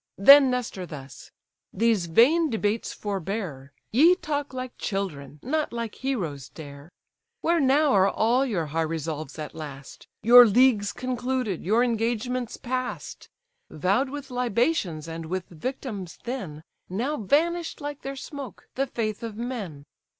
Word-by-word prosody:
Then 275 +6 +9
Nestor 240 -7 -3
thus—"These 170 +8 -4
vain 295 - +4
debates 220 -1 -1
forbear, 190 -8 -4 0.2
Ye 320 +10 +6
talk 295 -5 -3
like 255 -1 -6
children, 150 -8 -4
not 305 +4 -1
like 230 -2 -4
heroes 165 - -3
dare. 145 -1 -11 0.5
Where 340 0 +2
now 285 +1 +4
are 195 -1 +5
all 235 +6 +2
your 200 -11 -1
high 165 - +1
resolves 155 -2 -4
at 150 -1 -6
last? 145 -3 -9 0.2
Your 240 +2 +9
leagues 220 -2 +4
concluded, 250 -5 -2
your 220 +7 +3
engagements 240 +1 -1
past? 255 0 -5 0.4
Vow'd 195 - +1
with 285 -1 -7
libations 235 - 0
and 165 0 -6
with 185 +1 -3
victims 200 - -5
then, 190 - -5 0.3
Now 240 +11 -1
vanish'd 330 - 0
like 290 -1 -6
their 275 0 -5
smoke: 270 - -9
the 275 +1 -1
faith 215 -4 -3
of 225 -2 -6
men! 210 - -5
230 Hz, 135 wpm, -26 LUFS, 170-260 Hz, 0.5 s, Then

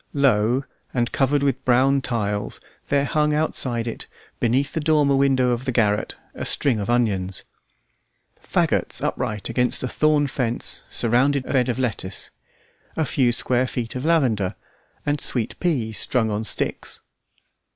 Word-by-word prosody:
Low 130 -2 +2 0.3
and 120 -1 0
covered 140 +1 +1
with 135 -2 0
brown 135 +2 +3
tiles, 105 -5 -2 0.3
there 140 0 +2
hung 150 0 +1
outside 125 -6 0
it, 115 - -5 0.3
beneath 130 +4 +1
the 160 - -1
dormer 150 -2 +3
window 135 -2 +3
of 120 +1 -2
the 130 - 0
garret, 105 -4 +1 0.2
a - - -6
string 130 -7 +1
of 100 - -4
onions. 95 -7 0 1.0
Faggots - - 0
upright 105 -2 -2
against 125 +2 +1
a - - 0
thorn 150 +1 +2
fence 125 -3 -1
surrounded 130 +4 +2
a - - -5
bed 130 -2 +2
of 125 - -1
lettuce, 115 -7 -3 0.7
a 160 - +1
few 125 -2 +2
square 125 +1 +1
feet 120 -3 -4
of 125 - -5
lavender, 130 - +1 0.5
and 145 -1 0
sweet 115 -4 +2
peas 125 - 0
strung 115 -4 +1
on 105 +1 -2
sticks. - - -2
125 Hz, 150 wpm, -22 LUFS, 115-140 Hz, 1.0 s, brown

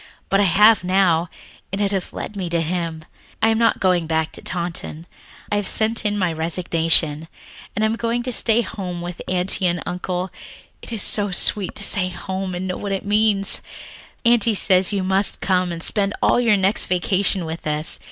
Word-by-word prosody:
But 195 - +3
I 205 - +3
have 210 +4 +5
now, 180 -3 +1 0.4
and 195 - -3
it 200 -1 0
has 190 -3 -3
led 210 - -7
me 185 -3 -4
to 170 0 0
Him. 165 -1 -4 0.3
"I 220 - +2
am 225 0 +1
not 230 -1 +2
going 180 -3 +1
back 160 -1 -1
to - - -12
Taunton. 170 -2 -5 0.5
I 205 - +1
have 205 -2 -3
sent 225 +1 +5
in 205 0 -2
my 180 -4 0
resignation. 160 -1 +1 0.5
I 215 - +2
am 220 +1 0
going 235 +1 -2
to 250 - -4
stay 235 0 +2
home 185 -4 -6
with 175 0 -7
Aunty 185 +1 +2
and 175 0 -1
Uncle. 180 +1 -4 0.5
It - - -11
is 220 -4 -1
so 205 -1 +4
sweet 190 +1 +1
to 200 - +1
say 185 -2 0
home 190 +1 -5
and 180 +1 -4
know 185 - -4
what 200 - -5
it 195 - -4
means. 205 -1 +2 0.6
"Aunty 235 -2 +4
says 185 -1 +3
you 200 -2 -2
must 190 +2 -1
come 185 -2 0
and 170 0 -4
spend 200 -1 0
all - - +2
your 230 -4 +3
next 195 +2 0
vacation 185 0 0
with 160 0 -7
us. 150 +1 -3
190 Hz, 195 wpm, -20 LUFS, 175-205 Hz, 0.6 s, have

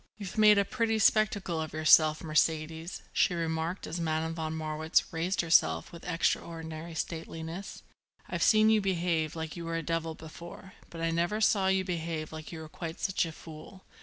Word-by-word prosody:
"You've 200 -4 -7
made 210 -1 +6
a 200 - +3
pretty 230 0 0
spectacle 205 -6 +2
of 155 -2 -5
yourself, 155 0 +5
Mercedes," 160 +2 0
she 180 - +2
remarked 165 +2 -2
as 165 - -5
Madame 160 0 -1
von 160 -1 -3
Marwitz 155 0 +1
raised 170 +4 0
herself 80 - +3
with 170 - -11
extraordinary 165 -1 -2
stateliness. 165 +3 -6 0.4
"I've - - -4
seen 215 0 +5
you 215 -1 +4
behave 170 -4 0
like 160 -1 -5
you 170 - -6
were 165 0 -3
a 165 - -3
devil 165 0 -2
before, 170 +4 -11 0.2
but 165 - -8
I 165 0 +1
never 175 +6 0
saw 200 -3 +3
you 190 0 +2
behave 165 -3 -3
like 155 -1 -8
you 165 -2 -7
were 160 - -8
quite 165 +2 -7
such 190 -3 0
a - - -6
fool. 160 +4 -12
165 Hz, 180 wpm, -30 LUFS, 160-185 Hz, 0.4 s, made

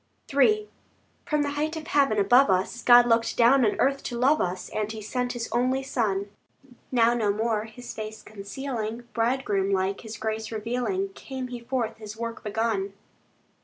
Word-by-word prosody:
III 425 +10 +3 0.6
From 300 -3 +1
the 285 - -2
height 305 +3 -2
of 310 - -7
heaven 275 -8 +2
above 245 +6 +5
us, 190 +6 0
God 240 0 +7
looked 230 -1 +1
down 250 +3 +5
on 215 - +1
earth 275 +1 +2
to 240 - -3
love 275 +5 +3
us, 180 +1 -2
And 215 0 -2
He 220 - -6
sent 245 +4 -2
His 235 -2 -4
only 255 +3 +1
Son. 205 -6 -1 0.6
Now 235 -2 +4
no 220 -4 +1
more 215 0 -1
His 225 +3 -9
face 215 0 -7
concealing, 225 +2 -5
Bridegroom 225 -5 0
like, 190 0 0
His 220 -1 -8
grace 220 0 -3
revealing, 250 - -2
Came 265 -9 -7
He 245 -1 -6
forth 235 -2 -2
His 215 -1 -9
work 230 0 -5
begun. 210 -2 -1
230 Hz, 170 wpm, -26 LUFS, 215-260 Hz, 0.6 s, God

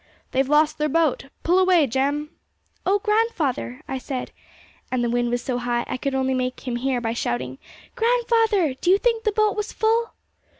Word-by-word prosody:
'They've 265 +1 +1
lost 300 +1 +3
their 300 0 +1
boat. 320 -3 +1 0.2
Pull 355 +3 +3
away, 365 -4 +5
Jem!' 280 +4 -1 0.6
'Oh, 395 +2 +4
grandfather!' 400 - -1
I 265 -1 -3
said, 255 -1 -5 0.6
and 255 -1 0
the 235 - 0
wind 240 0 +1
was 245 +1 -1
so 250 -2 -2
high, 240 -1 -1
I - - -4
could 275 +1 -2
only 265 0 +1
make 255 0 -3
him 240 -1 -1
hear 255 0 0
by 230 -1 -2
shouting, 130 - -3 0.4
'grandfather, 455 - +2
do 310 +7 -2
you 380 - +6
think 460 0 0
the 430 - +3
boat 425 0 +2
was 420 0 -3
full?' 455 +1 +1
290 Hz, 185 wpm, -23 LUFS, 250-410 Hz, 0.6 s, you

